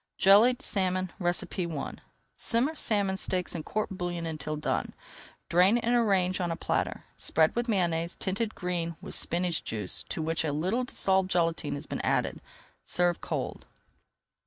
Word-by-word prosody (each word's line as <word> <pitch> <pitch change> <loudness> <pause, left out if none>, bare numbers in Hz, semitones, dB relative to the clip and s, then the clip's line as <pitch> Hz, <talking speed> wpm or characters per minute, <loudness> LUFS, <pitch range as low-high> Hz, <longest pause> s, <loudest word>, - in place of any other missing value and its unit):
JELLIED 230 +7 +6
SALMON 185 -2 0
I 175 -2 +2 1.0
Simmer 245 +7 +1
salmon 200 -9 +1
steaks 185 -1 -1
in 165 - -3
court 215 +6 -3
bouillon 175 -2 -3
until 155 -1 -4
done. 150 - -2 0.5
Drain 185 +6 +5
and 240 0 0
arrange 190 -6 +2
on 175 - 0
a 165 - -1
platter. - - -2
Spread 160 0 +2
with 240 0 -1
Mayonnaise, 170 -4 +1
tinted 210 +3 -2
green 170 -3 -3
with - - -7
spinach 175 -1 +1
juice 105 -4 0
to 160 - -2
which 160 +1 0
a 155 - 0
little 190 +12 0
dissolved 190 -5 +1
gelatine 165 -2 0
has - - -6
been - - -4
added. - - 0 0.4
Serve 175 -1 0
cold. - - -4
180 Hz, 150 wpm, -29 LUFS, 170-205 Hz, 1.0 s, JELLIED